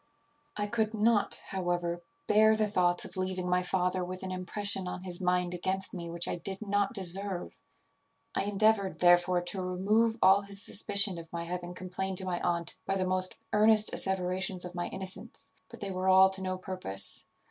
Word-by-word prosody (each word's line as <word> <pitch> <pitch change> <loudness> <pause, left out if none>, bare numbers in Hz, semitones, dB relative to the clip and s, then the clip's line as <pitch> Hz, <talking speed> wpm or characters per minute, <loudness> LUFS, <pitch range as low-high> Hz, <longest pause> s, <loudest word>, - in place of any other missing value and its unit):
"I 205 - 0
could 220 0 -1
not, 215 0 +2
however, 175 -2 -2 0.2
bear 220 +1 +5
the 215 0 +1
thoughts 180 -4 +1
of - - -9
leaving 185 -1 -2
my 180 0 +2
father 180 0 0
with 185 +1 -6
an 190 - -4
impression 190 +1 0
on 180 0 -5
his 180 -1 -3
mind 180 -1 +1
against 190 +2 0
me 170 -2 -6
which 170 0 +1
I - - -2
did 190 +3 -2
not 205 0 0
deserve. 190 0 -3 0.7
I - - -1
endeavoured, 205 -1 +2
therefore, 175 0 +4
to 180 +2 -3
remove 210 +5 +1
all 190 +1 +6
his 200 0 -4
suspicion 200 -3 +1
of 165 -1 -12
my 170 0 -4
having 175 +1 -5
complained 185 +1 -4
to 190 - +1
my 180 -1 -2
aunt 170 -1 -2
by 195 - 0
the 185 - 0
most 185 0 +2 0.2
earnest 215 0 +5
asseverations 185 -1 -1
of 180 - -7
my 175 -1 -3
innocence; 190 -1 -8 0.2
but - - -12
they 200 -1 -3
were 185 0 -1
all 190 0 +7
to 190 0 +1
no 185 0 -2
purpose. 100 - -3
185 Hz, 185 wpm, -30 LUFS, 180-200 Hz, 0.7 s, all